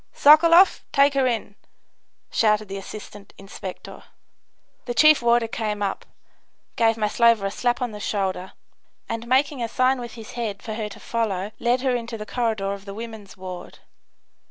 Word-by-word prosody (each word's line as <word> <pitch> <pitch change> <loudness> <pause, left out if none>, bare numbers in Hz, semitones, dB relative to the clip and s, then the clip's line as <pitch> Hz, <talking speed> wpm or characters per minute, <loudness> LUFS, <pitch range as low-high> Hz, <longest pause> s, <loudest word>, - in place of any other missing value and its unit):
"Sokoloff, 335 +5 +6
take 280 +1 +4
her 270 -2 +2
in!" 225 -4 -2 0.8
shouted 215 -2 +2
the 195 - -5
assistant 205 0 -10
inspector. 195 -1 -9 0.8
The 240 - -4
chief 305 0 +6
warder 235 -1 +3
came 210 -2 -3
up, 195 - -3 0.7
gave 225 -1 +2
Maslova 225 0 +3
a 195 - -1
slap 245 +3 -1
on 245 - -3
the 210 - -8
shoulder, 190 -3 -3 0.5
and 230 +1 -5
making 265 +1 +1
a 230 - -1
sign 255 +3 +1
with 240 -1 -7
his 225 -2 -10
head 220 -5 -4
for 220 - -5
her 215 -1 -4
to - - -12
follow 210 -4 -2
led 245 +2 +1
her 260 -2 +1
into 235 -1 -4
the 210 - -7
corridor 215 -5 -1
of 200 0 -9
the 200 -1 -8
women's 220 -3 -9
ward. 185 -1 -8
225 Hz, 165 wpm, -23 LUFS, 205-245 Hz, 0.8 s, Sokoloff